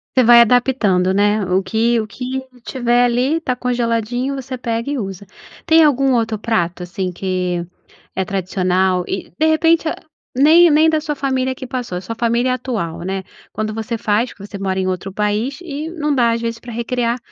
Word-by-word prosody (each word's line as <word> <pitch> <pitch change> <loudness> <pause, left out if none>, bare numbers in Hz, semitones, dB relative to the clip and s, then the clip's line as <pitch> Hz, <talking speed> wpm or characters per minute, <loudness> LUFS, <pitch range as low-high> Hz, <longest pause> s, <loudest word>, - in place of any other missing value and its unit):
Você 255 - +5
vai 235 0 +8
adaptando, 225 -7 +2
né? 205 +1 +2
O 185 +1 +1
que 225 +5 +1
o 215 - -3
que 255 +3 -4 0.2
tiver 245 -1 +1
ali 250 +6 +1
tá 255 -6 -2
congeladinho, 245 +1 -1
você 265 -1 -6
pega 230 +1 -3
e 290 - -1
usa. 195 -3 -6 0.4
Tem 325 -1 +6
algum 275 -3 +3
outro 225 -3 0
prato 180 -6 -1
assim 180 +1 -4
que 180 -1 -2 0.5
é 190 - -1
tradicional 185 -1 0
e, 195 - -5
de 315 - +3
repente, 325 +1 +3 0.5
nem 320 +5 +6
nem 310 +2 +5
da 315 -1 +1
sua 300 -1 -3
família 260 -2 -1
que 260 - -8
passou, 245 -7 -4
a - - -3
sua 230 +5 -5
família 235 +2 +1
atual, 225 -10 -4
né? 190 +2 -3 0.3
Quando 215 0 -3
você 225 +2 -3
faz, 220 +2 0
que 200 - -11
você 205 - -8
mora 190 -1 -2
em 190 - 0
outro 185 +1 -3
país, 210 - -1
e 305 -2 -5
não 300 -3 -1
dá 235 -3 +3
às 230 - -1
vezes 230 0 -3
pra 240 0 -9
recriar 235 +1 -1
235 Hz, 190 wpm, -18 LUFS, 195-260 Hz, 0.5 s, vai